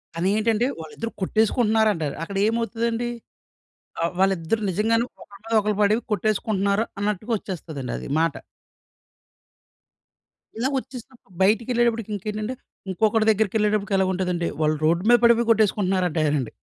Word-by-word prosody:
కానీ 175 +3 0
ఏంటంటే 225 +1 +1
వాళ్ళిద్దరూ 195 +8 -6
కొట్టేసుకుంటున్నారంటారు. 215 - +1
అక్కడ 195 +4 -5
ఏమవుతదండి 230 +1 -1 0.9
ఆ! - - +2
వాళ్ళిద్దరూ 190 +2 +1
నిజంగానే 225 +5 +1 0.2
ఒకళ్ళ 200 - -14
మీద 225 0 -3
ఒకళ్ళు 210 -1 -1
పడి 205 +1 +4 0.2
కొట్టేసుకుంటున్నారు. 205 0 0
అన్నట్టుగా 210 +2 -2
వచ్చేస్తదండి 160 - -6
అది - - -8
మాట. 165 -2 +1 2.2
ఇలా 255 +4 0
వచ్చేసినప్పుడు 255 -5 -9
బయటిళ్ళేటప్పటికి 230 +2 +1
ఇంకేంటంటే, 210 +4 -4 0.4
ఇంకొకడి 220 +3 +2
దగ్గరికి 220 0 +1
ఎళ్ళేటప్పటికి 210 -1 +1
ఎలాగ 190 -1 +2
ఉంటదంటే 180 -2 -1
వాళ్ళు 155 0 +2
రోడ్ 170 +3 +2
మీద 240 - +8
పడిపోయి 235 0 +4
కొట్టేసుకుంటున్నారంటారండి. 180 - +1
210 Hz, 115 wpm, -23 LUFS, 185-225 Hz, 2.2 s, మీద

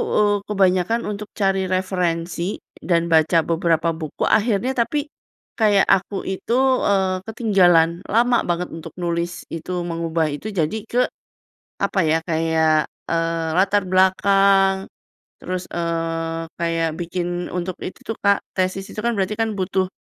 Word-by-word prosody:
eee, 205 -1 +3
kebanyakan 195 +2 +2
untuk 210 0 -6
cari 195 -2 +1
referensi 180 -1 -1 0.2
dan 170 -2 +1
baca 160 +1 +4
beberapa 165 0 +1
buku, 160 -2 -5
akhirnya 220 +3 +2
tapi 285 +5 +1 0.6
kayak 205 -3 +4 0.2
aku 195 +1 -6
itu, 190 +4 -3 0.3
eee, 190 -2 +1
ketinggalan 180 -7 +3
lama 240 +3 +3
banget 175 +1 -1
untuk 165 -1 -9
nulis 170 0 -2
itu, 165 +2 -6 0.2
mengubah 165 -1 -1
itu 145 +9 -6
jadi 160 +7 0
ke, 245 - +1 0.8
apa 195 - 0
ya, 160 - +4
kayak, 160 -1 +2 0.2
eee, 165 -1 0
latar 200 +1 +3
belakang, 195 +1 +3 0.5
terus, 185 0 -4
eee, 165 -1 -2
kayak 165 -1 0
bikin 175 0 -3
untuk 180 0 -3
itu - - -7
tuh 225 - -2
Kak 200 -1 +4 0.2
tesis 185 +1 -1
itu - - -7
kan 235 - +2
berarti 195 +1 0
kan 225 -1 0
butuh 185 0 0
180 Hz, 135 wpm, -21 LUFS, 165-200 Hz, 0.8 s, baca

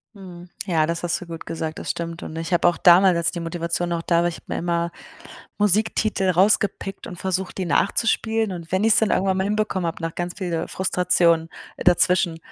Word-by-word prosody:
Mhm. 180 -3 -11 0.2
Ja, 165 -5 +2
das 170 +2 -3
hast 175 - -1
du 180 - -9
gut 165 -1 -8
gesagt, 160 -1 -4
das - - -3
stimmt. 170 -1 -6
Und 160 - -7
ich 165 +2 -4
habe 175 - +3
auch 175 - -3
damals, 180 0 +6
als 170 0 +1
die 175 - -5
Motivation 170 +1 -2
noch 170 -1 -1
da 170 0 +2
war 175 - +1
ich 170 - -7
habe - - -19
mir - - -3
immer 170 0 -1 0.7
Musiktitel 210 -1 +1
rausgepickt 195 +1 +1
und 180 - -8
versucht, 190 +1 -3
die 185 - -2
nachzuspielen. 220 +3 +1
Und 170 -2 -8
wenn 190 +1 +1
ich 225 -1 +5
es - - +4
dann 220 -2 +1
irgendwann 190 0 +1
mal 190 - 0
hinbekommen 205 -3 -1
habe, 165 - -5
nach 165 -1 -3
ganz 175 0 -4
viel 175 -3 -2
Frustration 170 -3 +1 0.3
dazwischen 175 -1 +2
175 Hz, 210 wpm, -22 LUFS, 170-190 Hz, 0.7 s, damals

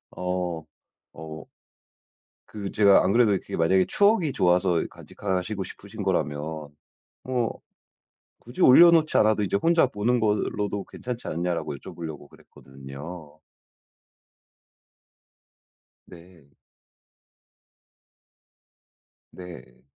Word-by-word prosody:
어. 90 -2 -3 0.5
어. 80 0 -9 1.0
그 100 -2 -7
제가 100 -2 +5
안 90 - +1
그래도 115 -1 +4
그게 95 - -4
만약에 95 +3 +3
추억이 200 - +2
좋아서 90 -4 +2
간직하시고 95 +1 -4
싶으신 - - -9
거라면 75 +1 -2 0.5
"뭐 125 -3 -2 0.8
굳이 120 +2 -6
올려놓지 165 +3 +6
않아도 110 0 +3
인제 100 -1 0
혼자 165 +7 +3
보는 120 +2 0
걸로도 105 -1 -1
괜찮지 125 -1 -7
않냐?"라고 85 -2 -3
여쭤보려고 75 0 -9
그랬거든요. 70 +5 -12 2.7
네. 85 -5 -17 2.8
네. 85 -9 -12
90 Hz, 205 characters per minute, -25 LUFS, 80-110 Hz, 2.8 s, 올려놓지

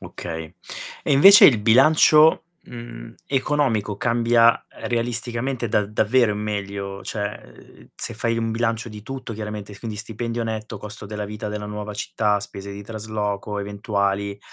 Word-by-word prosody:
Okay. 80 0 -7 0.5
E - - -3
invece 195 - +9
il 120 -7 +5
bilancio, 155 +7 +5 0.2
mhmm, 115 - -10
economico 130 -7 0
cambia 115 0 +3 0.2
realisticamente 120 +1 -1
da 105 0 +2
davvero 110 +3 +2
in 105 - -3
meglio? 100 -2 -4
Cioè, 105 -2 -3
ehm, - - -16
se 115 - -3
fai 115 +1 -1
un 115 -1 -1
bilancio 115 0 -1
di 105 -1 -10
tutto 130 0 -7
chiaramente, 105 -1 -6
quindi: 105 +1 -7
stipendio 115 +1 -4
netto, 110 -1 -5
costo 105 0 -8
della 105 0 -5
vita 105 +1 -6
della 105 0 -5
nuova 105 0 -6
città, 105 0 0
spese 100 0 -7
di 100 +1 -8
trasloco 105 -1 -4
eventuali, 100 0 -2
110 Hz, 145 wpm, -22 LUFS, 105-115 Hz, 0.5 s, invece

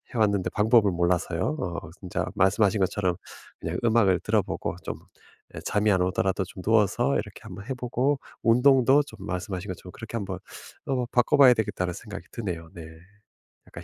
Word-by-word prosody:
해 - - 0
왔는데 100 -3 +2
방법을 110 -1 +4
몰라서요. 85 - 0
어 85 -2 -3 0.2
진짜 90 -2 -3
말씀하신 100 +1 +3
것처럼 95 -1 0 0.4
그냥 80 +2 -3
음악을 110 -6 +4
들어보고 105 0 -1
좀 - - -4 0.6
예 - - -5
잠이 105 +1 +1
안 95 -2 +2
오더라도 95 +1 0
좀 95 +1 -10
누워서 115 +5 +2
이렇게 105 -3 -4
한번 100 -2 -9
해 135 - -2
보고 125 +3 0 0.2
운동도 130 +3 +5
좀 145 - -14
말씀하신 95 +1 -4
것처럼 90 0 -7
그렇게 110 +2 -8
한번 95 -4 -4 0.5
어 130 -2 0
바꿔봐야 125 +2 +5
되겠다는 90 -5 -2
생각이 105 +3 -9
드네요 85 -8 -5
네. 85 -2 -8 0.8
약간 - - -10
105 Hz, 370 characters per minute, -26 LUFS, 90-115 Hz, 0.8 s, 운동도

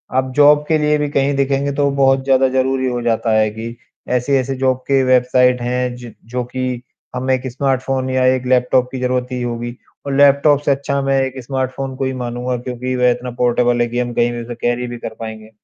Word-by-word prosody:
आप 130 0 +1
जॉब 145 0 +6
के 160 - +3
लिए 150 0 +2
भी 150 0 -1
कहीं 140 0 +1
देखेंगे 140 +1 0
तो 140 0 +2
बहुत 135 0 +3
ज़्यादा 135 -1 +3
ज़रूरी 130 0 0
हो 120 -1 -3
जाता 115 -1 0
है 110 0 +3
कि, 115 +2 -7 0.3
ऐसी-ऐसी 130 +1 0
जॉब 130 -1 +1
के 135 -1 +3
वेबसाइट 125 0 +3
हैं 125 0 -1
ज 120 -2 -10 0.2
जो 125 0 -1
कि 125 0 -4 0.3
हमें 130 +1 0
एक 130 +1 -5
स्मार्टफ़ोन 130 0 -1
या 130 0 +1
एक 130 0 -5
लैपटॉप 125 0 +2
की 130 - -5
ज़रूरत 125 0 0
ही 125 -1 -3
होगी। 120 0 -4 0.3
और 140 - -2
लैपटॉप 140 +1 +5
से - - +3
अच्छा 140 0 -1
मैं 135 0 +1
एक 130 0 -3
स्मार्टफ़ोन 130 +1 -3
को 135 - -1
ही 130 - -2
मानूँगा 125 +1 -3
क्योंकि 125 +1 -4
वह 125 0 +3
इतना 125 +1 -4
पोर्टेबल 120 0 +2
है 120 - +2
कि 120 +1 -3
हम 120 -1 -2
कहीं 120 0 +1
भी 120 0 -5
उसे 120 +1 -7
कैरी 120 +1 -1
भी 120 0 -6
कर 115 - -7
पाएँगे। 110 -1 -8
130 Hz, 220 wpm, -18 LUFS, 120-135 Hz, 0.3 s, जॉब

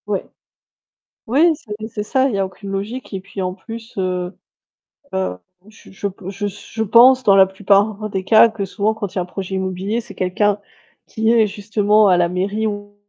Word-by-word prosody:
Ouais. - - -2 1.0
Oui, 305 +9 +4
c'est 210 -7 -8
c'est 210 -1 -4
ça. 260 +5 +1
Il 245 - -3
y - - -1
a 195 - +2
aucune 195 +1 -10
logique, 210 +7 -5
et 195 - -3
puis 195 +1 -7
en 185 0 -2
plus, 225 +4 -10
heu 180 -1 -2 0.8
heu, 190 - -2 0.3
je 215 +1 -17
je 200 +1 -3
pe 190 -1 -9
je 200 +1 -4
s 205 0 -6
je 225 - -1
pense 250 +4 +6
dans 200 -4 +5
la 190 -1 +7
plupart 205 +2 +1
des 190 -2 -3
cas 220 +4 +6
que 220 -3 -4
souvent 210 +3 -1
quand 210 -4 -6
il - - -17
y - - +2
a - - +1
un - - -9
projet 190 +1 -5
immobilier, 190 +4 -2
c'est 230 -3 -10
quelqu'un 205 +2 +1 0.5
qui 220 +1 0
est 225 -2 +4
justement 210 +1 +2
à 180 -2 +4
la 175 -1 +2
mairie 200 +5 -1
ou 205 -1 -6
205 Hz, 210 wpm, -19 LUFS, 190-220 Hz, 1.0 s, la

